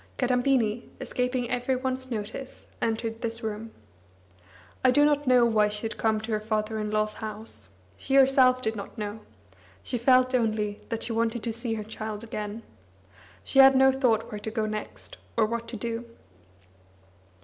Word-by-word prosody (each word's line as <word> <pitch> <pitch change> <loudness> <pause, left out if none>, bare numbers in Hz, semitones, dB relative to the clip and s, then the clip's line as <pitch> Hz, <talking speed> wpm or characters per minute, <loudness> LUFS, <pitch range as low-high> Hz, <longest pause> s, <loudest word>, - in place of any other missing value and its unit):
Kadambini, 250 -3 +1
escaping 250 0 -1
every 250 +2 0
one's 260 0 -3
notice, 230 +3 -6 0.2
entered 225 0 -1
this 230 0 -3
room. 220 +1 -4 1.1
I 260 - +6
do 290 +3 +5
not 290 -1 +1
know 250 -1 +6
why 215 -2 +3
she 210 +1 -3
had 225 - -3
come 220 -1 +1
to 220 +1 -5
her 215 - +1
father 215 0 -2
in 210 0 -2
law's 215 0 0
house; 215 - -5 0.3
she 270 - -1
herself 260 -2 +5
did 220 -1 0
not 200 +3 -8
know; 210 0 -4 0.6
she 245 - -2
felt 255 +1 +4
only 215 -4 0
that 230 -1 -3
she 230 - -2
wanted 230 0 0
to 230 - -1
see 230 0 -2
her 215 - -4
child 215 0 -6
again. 215 0 -5 0.8
She 270 - +1
had 270 0 +9
no 265 0 +6
thought 255 -5 +1
where 210 - -5
to 210 - -5
go 220 -1 -1
next, 215 - -6 0.2
or 225 - +5
what 235 +1 -3
to 235 - -5
do. 230 +2 -3
230 Hz, 170 wpm, -27 LUFS, 215-255 Hz, 1.1 s, had